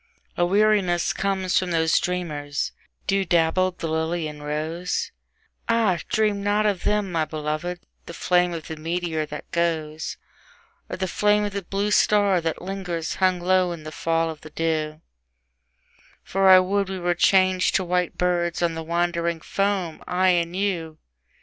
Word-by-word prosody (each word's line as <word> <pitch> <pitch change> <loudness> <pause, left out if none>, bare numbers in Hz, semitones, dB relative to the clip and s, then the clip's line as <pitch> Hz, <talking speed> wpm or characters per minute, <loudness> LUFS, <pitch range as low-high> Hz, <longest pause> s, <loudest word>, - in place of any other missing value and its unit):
A 175 - +2
weariness 200 -3 +2
comes 190 -2 0
from 185 - -3
those 160 -2 +3
dreamers, 150 -5 -3 0.3
dew 195 0 +1
dabbled, 175 +1 +2
the 165 - -3
lily 160 +1 -1
and 150 -1 -9
rose; 160 +4 -2 0.6
Ah, 220 -7 +2
dream 210 -2 +1
not 205 +1 +1
of 200 -4 +1
them, 210 -2 +1
my 165 -2 +1
beloved, 155 +3 -4 0.3
the - - -7
flame 180 -1 +2
of 165 -2 -5
the 160 - -6
meteor 165 -1 -2
that 150 0 -8
goes, 160 -2 -2 0.7
Or - - -4
the 190 0 -1
flame 210 +3 +2
of 205 - -4
the 200 - -2
blue 200 +3 -2
star 205 -3 +3
that 165 +1 -3
lingers 180 -4 -4
hung 185 -1 +3
low 185 0 +2
in 160 -2 -9
the 155 - -7
fall 165 0 0
of 155 - -11
the 155 - -11
dew: 155 -1 -2 1.2
For 195 0 +2
I 185 - +10
would 195 +1 0
we 190 - -3
were 175 -1 0
changed 185 +1 +3
to 190 - +2
white 180 -1 -1
birds 175 -1 0
on 170 -1 +1
the 165 - -4
wandering 170 0 -1
foam: 195 -2 -2
I 185 +1 +2
and 170 -1 +1
you! 175 -5 -2
175 Hz, 165 wpm, -24 LUFS, 165-190 Hz, 1.2 s, I